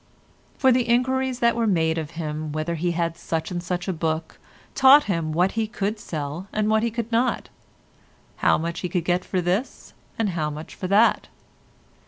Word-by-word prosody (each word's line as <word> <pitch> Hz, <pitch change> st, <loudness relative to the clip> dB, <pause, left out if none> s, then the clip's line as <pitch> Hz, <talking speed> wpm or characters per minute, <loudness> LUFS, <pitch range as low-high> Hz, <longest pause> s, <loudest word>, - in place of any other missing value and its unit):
For 265 Hz, -1 st, +4 dB
the 245 Hz, -1 st, +1 dB
enquiries 260 Hz, +1 st, +1 dB
that 235 Hz, 0 st, +3 dB
were 230 Hz, -1 st, +1 dB
made 165 Hz, -4 st, +1 dB
of 155 Hz, -2 st, -6 dB
him 155 Hz, -1 st, -4 dB
whether 155 Hz, +3 st, -2 dB
he 170 Hz, +1 st, -1 dB
had 170 Hz, -1 st, -1 dB
such 165 Hz, +2 st, -3 dB
and 175 Hz, -1 st, -3 dB
such 180 Hz, +1 st, -3 dB
a 190 Hz, -, 0 dB
book 160 Hz, 0 st, -3 dB, 0.3 s
taught 275 Hz, +2 st, +7 dB
him 165 Hz, -5 st, -2 dB
what 180 Hz, +4 st, +2 dB
he 225 Hz, -1 st, -1 dB
could 210 Hz, 0 st, -3 dB
sell 155 Hz, +1 st, -5 dB
and 215 Hz, 0 st, 0 dB
what 220 Hz, 0 st, +3 dB
he 235 Hz, -, +1 dB
could 230 Hz, 0 st, -4 dB
not; 235 Hz, +3 st, 0 dB, 0.9 s
how -, -, +3 dB
much 170 Hz, +1 st, -3 dB
he 180 Hz, -, -3 dB
could 175 Hz, -1 st, -1 dB
get 180 Hz, +1 st, +1 dB
for 185 Hz, -, -1 dB
this, 185 Hz, +9 st, -2 dB, 0.2 s
and 225 Hz, -3 st, 0 dB
how 155 Hz, -3 st, -1 dB
much 150 Hz, +1 st, -8 dB
for 185 Hz, -, -5 dB
that. 210 Hz, +5 st, +3 dB
180 Hz, 195 wpm, -24 LUFS, 165-225 Hz, 0.9 s, taught